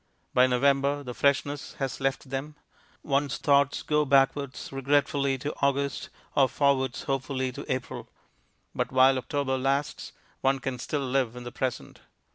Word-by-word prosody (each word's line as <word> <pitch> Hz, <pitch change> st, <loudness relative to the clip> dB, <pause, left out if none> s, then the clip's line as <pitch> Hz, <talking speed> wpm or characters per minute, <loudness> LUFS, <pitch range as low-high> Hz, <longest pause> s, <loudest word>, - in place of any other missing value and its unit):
By 125 Hz, 0 st, +5 dB
November 140 Hz, +3 st, +2 dB
the 125 Hz, -2 st, -6 dB
freshness 140 Hz, +3 st, 0 dB
has 135 Hz, -1 st, -4 dB
left 135 Hz, 0 st, -2 dB
them; 140 Hz, +3 st, -4 dB, 0.5 s
one's 140 Hz, 0 st, 0 dB
thoughts 140 Hz, -1 st, +2 dB
go 150 Hz, 0 st, +2 dB
backwards 135 Hz, -1 st, +1 dB
regretfully 140 Hz, 0 st, +1 dB
to 145 Hz, +4 st, -4 dB
August 140 Hz, 0 st, 0 dB, 0.3 s
or 135 Hz, -2 st, +4 dB
forwards 140 Hz, -1 st, +1 dB
hopefully 130 Hz, -1 st, -2 dB
to -, -, -7 dB
April; 130 Hz, -1 st, -4 dB, 0.6 s
but -, -, -2 dB
while 130 Hz, 0 st, +5 dB
October 130 Hz, 0 st, -1 dB
lasts, 140 Hz, +2 st, -1 dB, 0.3 s
one 135 Hz, +1 st, +2 dB
can 130 Hz, -2 st, -4 dB
still 140 Hz, +2 st, -2 dB
live 125 Hz, -2 st, 0 dB
in 125 Hz, -, -8 dB
the 120 Hz, -, -7 dB
present. 125 Hz, 0 st, -4 dB
135 Hz, 145 wpm, -27 LUFS, 130-140 Hz, 0.6 s, By